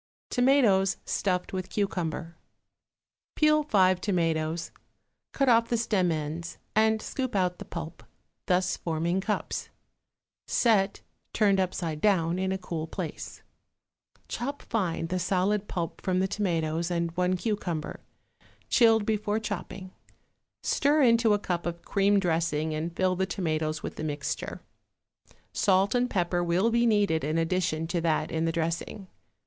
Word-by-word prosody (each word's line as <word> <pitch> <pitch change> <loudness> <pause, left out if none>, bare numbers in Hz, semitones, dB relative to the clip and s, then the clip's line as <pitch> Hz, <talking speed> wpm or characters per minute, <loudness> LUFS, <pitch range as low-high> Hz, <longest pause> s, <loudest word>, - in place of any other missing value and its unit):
=Tomatoes 235 -8 +3
Stuffed 180 -2 -1
with 185 -1 -3
Cucumber.= 170 -4 -2 1.0
Peel 305 0 +4
five 185 -10 +3
tomatoes, 165 -3 -1 0.6
cut 275 - 0
off 230 -1 +4
the 235 - +1
stem 205 -6 +1
ends 160 +2 -4 0.2
and 220 0 +4
scoop 260 -4 -3
out 180 -2 +1
the - - -7
pulp, 170 -1 -7 0.5
thus 180 0 +2
forming 170 +3 -1
cups; 210 +2 -3 0.8
set, 205 -5 +2 0.3
turned 200 -3 +3
upside 170 -4 -2
down, 180 -4 +2
in 190 0 0
a 190 - 0
cool 165 -3 -5
place. 170 -1 -6 0.8
Chop 280 +4 -4
fine 185 -8 -1
the 180 +2 -2
solid 195 +3 0
pulp 170 -2 -4
from 185 -1 0
the 190 +1 +2
tomatoes 170 -5 -1
and 170 -1 -1
one 180 +2 0
cucumber, 175 -7 -3 0.7
chilled 225 -3 +5
before 215 0 0
chopping; 190 -3 -6 0.7
stir 295 +1 +3
into 230 -3 +5
a - - +1
cup 175 -4 -3
of 170 0 -5
cream 200 0 +2
dressing 160 -3 0
and 165 +2 -3
fill 185 -1 +1
the 190 +1 0
tomatoes 155 -4 -2
with - - -6
the - - -4
mixture. 145 -2 -4 0.9
Salt 195 +1 +3
and 250 0 +1
pepper 175 -2 0
will 180 +7 +2
be 235 +1 +3
needed 205 -8 +2
in 155 +3 0
addition 165 -1 0
to 170 +1 -1
that 165 -2 0
in 160 0 0
the 165 - +1
dressing. 170 +4 -3
185 Hz, 140 wpm, -28 LUFS, 165-210 Hz, 1.0 s, chilled